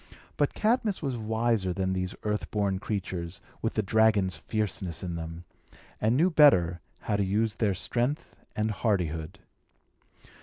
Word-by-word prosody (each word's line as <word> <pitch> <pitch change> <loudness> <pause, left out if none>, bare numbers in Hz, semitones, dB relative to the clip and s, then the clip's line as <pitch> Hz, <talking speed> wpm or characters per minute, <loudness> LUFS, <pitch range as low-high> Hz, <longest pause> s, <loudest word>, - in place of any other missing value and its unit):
But 145 - +1
Cadmus 215 -4 +1
was 135 -3 -1
wiser 110 -3 0
than 95 0 -1
these 90 0 -2
earth 105 0 -2
born 100 -3 0
creatures, 95 -4 -4 0.2
with 115 - -1
the 110 - +1
dragon's 105 -3 +3
fierceness 95 -2 -3
in 90 -2 -3
them, 80 +1 -6 0.6
and 110 +4 +3
knew 175 +5 +4
better 90 - +5 0.2
how 105 - 0
to 100 - +2
use 105 +3 0
their 100 -4 +1
strength 120 - -1 0.2
and 110 +1 0
hardihood. 90 -5 -1
105 Hz, 145 wpm, -28 LUFS, 90-115 Hz, 0.6 s, better